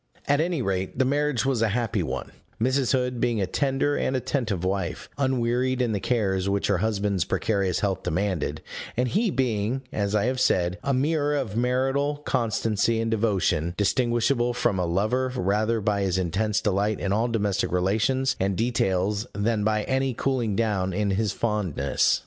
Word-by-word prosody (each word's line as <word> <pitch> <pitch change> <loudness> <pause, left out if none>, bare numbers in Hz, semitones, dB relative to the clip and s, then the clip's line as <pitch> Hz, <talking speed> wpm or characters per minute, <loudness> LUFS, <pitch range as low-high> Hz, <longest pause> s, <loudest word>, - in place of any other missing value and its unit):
At 145 +1 +3
any 165 -5 -1
rate 95 0 -2
the 130 - +3
marriage 145 -2 +1
was 130 -4 +1
a 115 - +4
happy 115 -3 -1
one; - - -4 0.3
Mrs. 130 +2 +1
Hood 125 -2 0
being 120 -3 +1
a 95 - +1
tender 140 +6 0
and 130 - 0
attentive 120 - -1
wife, 95 -2 -2
unwearied 130 -1 +1
in 125 -2 +1
the 105 - -1
cares 100 -5 0
which 100 0 0
her 100 -4 +2
husband's 100 -3 0
precarious 100 -2 0
health 100 -2 0
demanded, 90 0 -2 0.3
and 125 0 +1
he 210 - +1
being 125 - -1
(as 100 0 -1
I 105 - +2
have 130 +1 0
said) 90 -5 +1
a 140 - 0
mirror 145 +2 +1
of 125 -8 -2
marital 135 +4 +1
constancy 115 -2 +1
and 115 0 -1
devotion, 95 -6 +1
distinguishable 120 +3 +1
from 110 -6 +1
a 90 - 0
lover 110 +9 0
rather 110 +2 +1
by 105 -1 0
his 95 -2 0
intense 100 +4 0
delight 105 +1 0
in 100 - -1
all 110 +3 +1
domestic 105 -5 0
relations 110 +9 +1
and 95 0 0
details 105 -1 0
than 105 +1 0
by 110 0 +1
any 130 0 0
cooling 120 -6 0
down 95 -4 0
in 100 +1 0
his 105 +1 0
fondness. 100 -11 0
110 Hz, 170 wpm, -25 LUFS, 100-130 Hz, 0.3 s, a